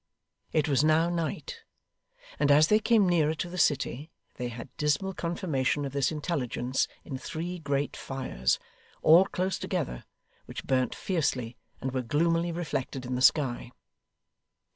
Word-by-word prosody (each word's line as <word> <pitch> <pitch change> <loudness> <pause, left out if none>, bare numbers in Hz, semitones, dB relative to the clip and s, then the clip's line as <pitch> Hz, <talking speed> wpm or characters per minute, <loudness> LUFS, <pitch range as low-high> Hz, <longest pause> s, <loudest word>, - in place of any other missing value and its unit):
It 155 -1 +1
was 140 -1 +3
now 160 +2 +3
night, 175 - -3 0.8
and 145 - +2
as 150 +2 +6
they 215 - +5
came 220 -3 +4
nearer 160 -3 +2
to 175 - -3
the 180 +1 -6
city 145 -1 +1 0.2
they 125 - -4
had 115 -1 -9
dismal 150 +6 0
confirmation 160 -6 -1
of 135 - -4
this 140 +1 +1
intelligence 135 -5 -1 0.2
in 130 - -6
three 175 +5 -5
great 140 -2 -1
fires, 130 - -1 0.5
all 170 +4 +7
close 185 -1 -2
together, - - -3 0.4
which - - -7
burnt 130 -1 +1
fiercely 130 -10 -1 0.3
and 130 - -2
were 130 0 -1
gloomily 165 +7 +1
reflected 145 -6 -3
in 125 - -3
the 125 - -1
sky. 130 -3 +3
150 Hz, 145 wpm, -28 LUFS, 130-170 Hz, 0.8 s, all